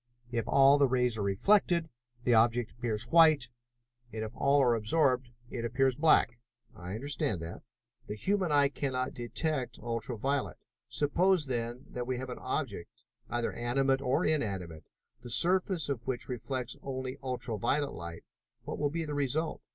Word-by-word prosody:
If 115 -2 -2
all 140 +1 +6
the 140 - +5
rays 125 -2 +1
are - - -1
reflected, 170 - +2 0.4
the 120 - +3
object 115 +1 +3
appears 115 -3 -1
white, 155 -7 +6 0.6
and 110 0 -4
if 110 - -5
all 140 +1 +3
are 120 -2 +4
absorbed, 125 +2 +1 0.2
it 115 - -4
appears 130 +2 +1
black." 130 -5 +3 0.4
"I 90 0 -6
understand 140 - -2
that." 80 +2 -7 0.5
"The 105 - -4
human 190 - 0
eye 145 -1 +4
cannot 130 -3 -2
detect 125 +3 -3
ultra 115 0 -4
violet. 135 +5 -1 0.3
Suppose 150 +7 +2
then, 120 0 -4
that 125 0 -4
we 130 -1 -1
have 130 0 -5
an - - -7
object, 130 - -4 0.3
either 120 -1 -1
animate 135 +3 +1
or 140 +5 +1
inanimate, 95 - -2 0.4
the 120 - -9
surface 180 - +2
of 125 -5 -4
which 125 -2 -3
reflects 125 0 -4
only 130 0 -5
ultra 125 -4 -3
violet 140 +4 0
light, 85 -1 -8 0.4
what - - -5
will 145 - +1
be 165 +2 -3
the 150 - -4
result? 145 +3 -1
130 Hz, 160 wpm, -31 LUFS, 120-145 Hz, 0.6 s, all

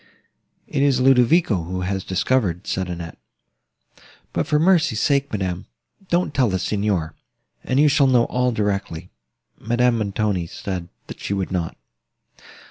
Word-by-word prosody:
"It 140 - -1
is 140 -3 +3
Ludovico, 125 - +4
who 90 +3 -4
has 95 +1 -2
discovered," 95 -2 0
said 95 -1 -2
Annette: 85 -1 -7 1.1
"but - - -1
for 150 - +2
mercy's 160 - +3
sake, 140 +1 +1
madam, 95 -4 -3 0.4
don't 175 -3 +1
tell 130 -5 +2
the 95 - 0
Signor, 100 -6 -1 0.5
and 130 - 0
you 150 - +6
shall 140 -1 +4
know 125 -2 +4
all 125 0 0
directly." 100 -5 -3 0.5
Madame 120 +1 +1
Montoni 100 -4 -1
said, 90 -1 -5 0.2
that - - -10
she 100 - -3
would 95 -1 -3
not. 85 -3 -3
105 Hz, 140 wpm, -22 LUFS, 95-130 Hz, 1.1 s, you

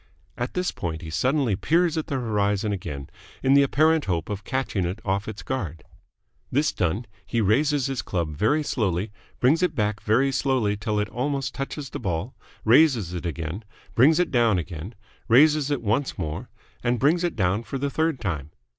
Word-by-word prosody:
At 120 +1 -4
this 180 0 0
point 80 -2 -5
he 80 - -7
suddenly 130 - +1
peers 165 - +2
at 160 - -2
the 140 - -2
horizon 105 -3 0
again, 70 -7 -5 0.4
in 135 - +4
the 140 - +7
apparent 155 +3 +3
hope 85 -4 -1
of 100 -1 -4
catching 130 -5 -1
it 90 +5 -3
off 100 +1 -1
its 110 -1 -6
guard. 90 - -4 0.7
This 145 +3 +2
done, 95 +7 -1 0.2
he 115 - -2
raises 135 +6 +2
his 135 -2 -2
club 85 -5 -3
very 130 - +2
slowly, 100 - -1 0.3
brings 150 +7 +4
it 180 - +1
back 105 -1 0
very 130 +6 +2
slowly 130 -7 +1
till 105 0 -1
it 105 -1 -1
almost 135 +1 -2
touches 135 +1 -5
the - - -5
ball, 95 +6 -3 0.3
raises 120 - +4
it 90 0 -3
again, 85 +5 -4 0.3
brings 145 +7 +5
it 180 - +1
down 115 -6 +3
again, 90 +4 -6 0.3
raises 150 +4 +5
it 145 -5 -1
once 115 +6 0
more, 80 -3 -4 0.3
and 120 +1 +1
brings 160 +8 +2
it 175 - -1
down 100 0 +1
for 115 +4 -5
the 140 +1 -2
third 160 -3 0
time. 80 -9 -3
115 Hz, 185 wpm, -25 LUFS, 95-140 Hz, 0.7 s, the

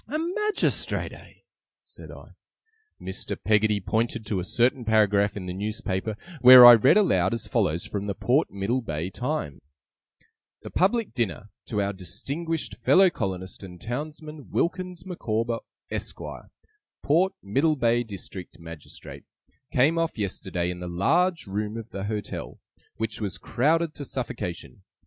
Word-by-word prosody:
'A 290 +6 -2
Magistrate, 400 +6 0
eh?' - - -14 0.5
said - - -13
I. - - -12 0.7
Mr. 95 +1 -5
Peggotty 105 -1 +2
pointed 110 +4 -1
to 105 -3 -1
a - - -3
certain 120 +6 +1
paragraph 105 -2 +2
in 95 - -6
the 90 - -4
newspaper, 105 0 -3 0.2
where 125 0 +11
I 120 - +12
read 130 - +5
aloud 95 - +3
as 115 - -4
follows, 90 - 0
from 100 0 -4
the 100 - -2
Port 135 +10 +1
Middlebay 100 -4 -2
Times: 125 - -3 1.0
'The - - -8
public 205 - +1
dinner 105 -3 -3 0.2
to 105 -3 -1
our 100 +1 -2
distinguished 135 - -4
fellow 185 - +5
colonist 95 - -4
and 90 -3 -10
townsman, 150 - -6
WILKINS 180 0 -2
MICAWBER, 115 -10 -2 0.3
ESQUIRE, - - -6 0.5
Port 180 +6 +3
Middlebay 120 0 +2
District 95 -4 -8
Magistrate, 85 -3 -11 0.5
came 150 +6 +3
off 165 -4 -1
yesterday 95 -3 -2
in 90 - -7
the 90 - -6
large 165 - +1
room 105 +2 -3
of 115 -1 -8
the 95 0 -5
Hotel, 105 0 -5 0.4
which 110 0 -4
was 95 -5 -3
crowded 155 - +1
to 145 - -7
suffocation. 125 - -5
110 Hz, 140 wpm, -26 LUFS, 100-150 Hz, 1.0 s, I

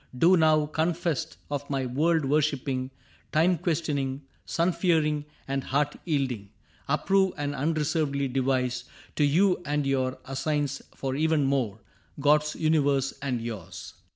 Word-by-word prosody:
Do 175 +8 +6
now, 155 -2 +4
confessed 160 0 -1
of 145 0 -3
my 135 -2 -1
world 155 +5 +1
worshiping. 135 -3 0 0.4
Time 170 +4 +4
questioning, 145 -5 -1 0.2
sun 170 +2 +1
fearing, 155 -5 +1 0.2
and 135 0 -2
heart 145 +2 0
yielding, 130 - -1 0.4
Approve 190 +6 +2
and 145 0 -2
unreservedly 150 -1 0
devise 130 -1 0 0.3
To 150 - +3
you 180 +6 +3
and 145 -2 -1
your 130 -1 0
assigns 140 +1 -1
for 135 -1 -3
evermore, 140 -8 +1 0.4
God's 150 +1 +3
universe 145 -4 +2
and 130 -4 -1
yours. 110 -7 -7
145 Hz, 125 wpm, -27 LUFS, 135-155 Hz, 0.4 s, Do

